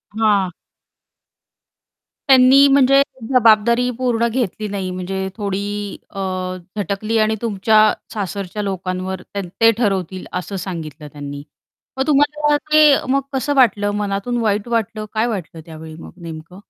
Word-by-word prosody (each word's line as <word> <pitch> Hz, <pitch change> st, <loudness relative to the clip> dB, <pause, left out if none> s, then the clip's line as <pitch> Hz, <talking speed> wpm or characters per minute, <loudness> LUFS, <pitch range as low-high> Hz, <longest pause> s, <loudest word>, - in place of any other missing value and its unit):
हां. 205 Hz, -4 st, +2 dB, 1.8 s
त्यांनी 265 Hz, +1 st, +7 dB
म्हणजे 275 Hz, 0 st, +5 dB, 0.3 s
जबाबदारी 235 Hz, +1 st, +4 dB
पूर्ण 240 Hz, -2 st, +1 dB
घेतली 220 Hz, -3 st, -2 dB
नाही 195 Hz, -2 st, -3 dB
म्हणजे 190 Hz, +1 st, -4 dB
थोडी 200 Hz, -2 st, -2 dB, 0.5 s
अ, 195 Hz, -, -9 dB, 0.6 s
झटकली 205 Hz, +3 st, -2 dB
आणि 220 Hz, 0 st, +2 dB
तुमच्या 215 Hz, -1 st, +2 dB, 0.3 s
सासरच्या 200 Hz, 0 st, -4 dB
लोकांवर 185 Hz, -1 st, -4 dB
त्यान 200 Hz, 0 st, -6 dB
ते 225 Hz, 0 st, +7 dB
ठरवतील 190 Hz, -5 st, -1 dB
असं 185 Hz, +3 st, -7 dB
सांगितलं 160 Hz, -5 st, -7 dB
त्यांनी. 145 Hz, -1 st, -7 dB, 0.5 s
मग 265 Hz, +2 st, -1 dB
तुम्हाला 295 Hz, 0 st, +2 dB, 0.2 s
ते 310 Hz, 0 st, +6 dB, 0.3 s
मग 275 Hz, +1 st, +2 dB
कसं 265 Hz, +2 st, -1 dB
वाटलं 205 Hz, -6 st, +3 dB
मनातून 205 Hz, +4 st, -2 dB
वाईट 210 Hz, -1 st, 0 dB
वाटलं, 220 Hz, -2 st, -2 dB
काय 220 Hz, +2 st, +1 dB
वाटलं 175 Hz, -7 st, -5 dB
त्यावेळी 160 Hz, -1 st, -10 dB
मग -, -, -11 dB
नेमकं? 165 Hz, +2 st, -9 dB
210 Hz, 125 wpm, -19 LUFS, 185-240 Hz, 1.8 s, त्यांनी